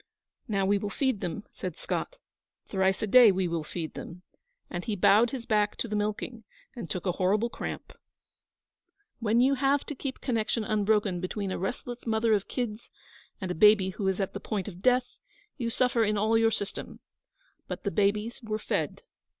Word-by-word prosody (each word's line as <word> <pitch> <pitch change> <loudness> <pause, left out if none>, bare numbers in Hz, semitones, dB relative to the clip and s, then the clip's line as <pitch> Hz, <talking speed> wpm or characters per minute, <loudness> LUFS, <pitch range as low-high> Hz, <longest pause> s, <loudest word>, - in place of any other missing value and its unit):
'Now 200 -4 +1
we 200 +1 +3
will 205 - -3
feed 260 -1 0
them,' 180 +3 -3
said 180 -4 -5
Scott; - - -3 0.5
'thrice 190 0 +1
a - - +3
day 235 +1 +8
we 185 -1 0
will 165 -2 -2
feed 160 +1 -5
them'; 180 +2 -9 0.4
and 175 0 -5
he 220 -3 -2
bowed 205 +5 +5
his 245 -2 -5
back 210 -3 +2
to - - -3
the 210 - -3
milking, 215 +3 -2 0.3
and 230 -9 -6
took 180 0 -3
a 180 - +2
horrible 205 +6 +1
cramp. - - -6 1.3
When 230 +1 +3
you 265 +2 +4
have 275 +1 +2
to - - -5
keep 270 -1 -5
connection 230 -2 0
unbroken 210 -3 +1
between 195 +1 -3
a - - -3
restless 240 +5 -5
mother 220 0 +2
of 200 -2 +1
kids 235 -3 -4 0.5
and 185 -2 -3
a - - 0
baby 200 +1 +5
who 195 +1 -3
is 190 0 0
at 195 - -1
the 200 - -4
point 205 -1 -3
of 185 -3 -8
death, 250 +2 +2 0.4
you 235 -2 -1
suffer 245 -1 +2
in 210 -1 +1
all 215 +2 +2
your 225 0 +5
system. 210 -2 -4 0.7
But - - -5
the - - -1
babies 210 +4 0
were 215 -2 -2
fed. 220 - -2
210 Hz, 190 wpm, -28 LUFS, 195-235 Hz, 1.3 s, day